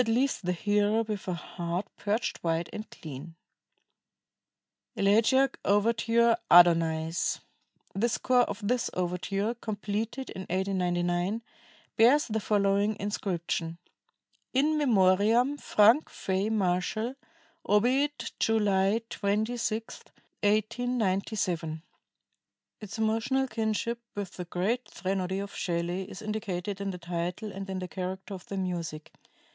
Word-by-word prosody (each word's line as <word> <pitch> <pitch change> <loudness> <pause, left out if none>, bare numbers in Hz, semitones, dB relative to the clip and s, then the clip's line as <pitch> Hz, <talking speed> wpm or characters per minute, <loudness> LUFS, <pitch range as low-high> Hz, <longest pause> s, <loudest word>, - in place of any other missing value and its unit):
leaves 250 +4 +1
the 180 -2 -1
hearer 205 +4 +2
with 215 -3 -5
a 180 - -1
heart 175 +2 -4
purged 210 +3 -1
white 165 0 -1
and 215 - -6
clean." 155 +2 -9 1.6
ELEGIAC 225 +7 +3
OVERTURE, 230 +3 +3
"ADONAIS" 165 -1 +4 0.5
The 225 +5 +1
score 250 +1 +3
of 205 -3 -2
this 245 +1 +1
overture, 190 +4 -1
completed 220 +3 -4
in 190 - -6
1899, 180 +2 0 0.5
bears 255 +7 +6
the 220 -1 -1
following 205 0 +2
inscription: 175 -5 -2 0.8
"In 295 +4 +3
memoriam 225 +3 +3
Frank 225 +8 +4
Fay 190 +2 -1
Marshall, 210 +3 0 0.5
obiit 260 +8 +2
July 210 0 +2
26, 220 +2 -1 0.4
1897." 205 -7 0 1.0
Its 210 0 -8
emotional 225 +5 +1
kinship 225 0 -1 0.2
with 200 -3 -4
the 180 - -7
great 200 +9 -1
threnody 190 0 -2
of 200 0 -5
Shelley 175 +2 -2
is - - -9
indicated 205 -2 -3
in 200 - -2
the 185 - -4
title 175 +4 -4
and 195 0 -7
in 190 - -3
the 185 0 -4
character 190 +2 -5
of 185 -2 -9
the 195 - -5
music. 170 -5 -4
205 Hz, 110 wpm, -29 LUFS, 180-225 Hz, 1.6 s, bears